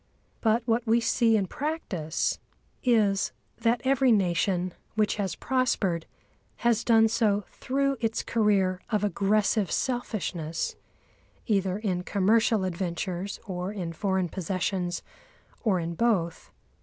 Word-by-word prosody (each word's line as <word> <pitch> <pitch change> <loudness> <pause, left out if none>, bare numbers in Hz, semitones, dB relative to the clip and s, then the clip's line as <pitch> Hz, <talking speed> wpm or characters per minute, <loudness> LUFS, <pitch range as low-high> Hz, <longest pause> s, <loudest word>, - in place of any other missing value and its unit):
But 225 +1 +2
what 230 0 +1
we 230 +1 +4
see 230 -1 +3
in 200 - +1
practice 190 - -2 0.4
is, 210 -6 +3 0.3
that 235 +1 +2
every 265 -1 +3
nation 185 -2 +1 0.2
which 215 -1 +1
has 195 -5 -2
prospered 210 -10 0 0.6
has 235 -1 +3
done 225 -1 +5
so 215 -3 +1
through 275 +1 -1
its 225 -1 -1
career 195 -5 +2
of 210 -2 0
aggressive 205 +1 +1
selfishness 180 -10 -2 0.7
either 195 -4 +1
in 190 -5 -1
commercial 215 +3 +2
adventures 185 +1 -3
or 185 -1 -4
in 180 -5 -4
foreign 190 0 0
possessions, 185 0 -2 0.6
or 200 -6 +2
in 170 0 -3
both. 170 -5 0
205 Hz, 120 wpm, -27 LUFS, 185-230 Hz, 0.7 s, done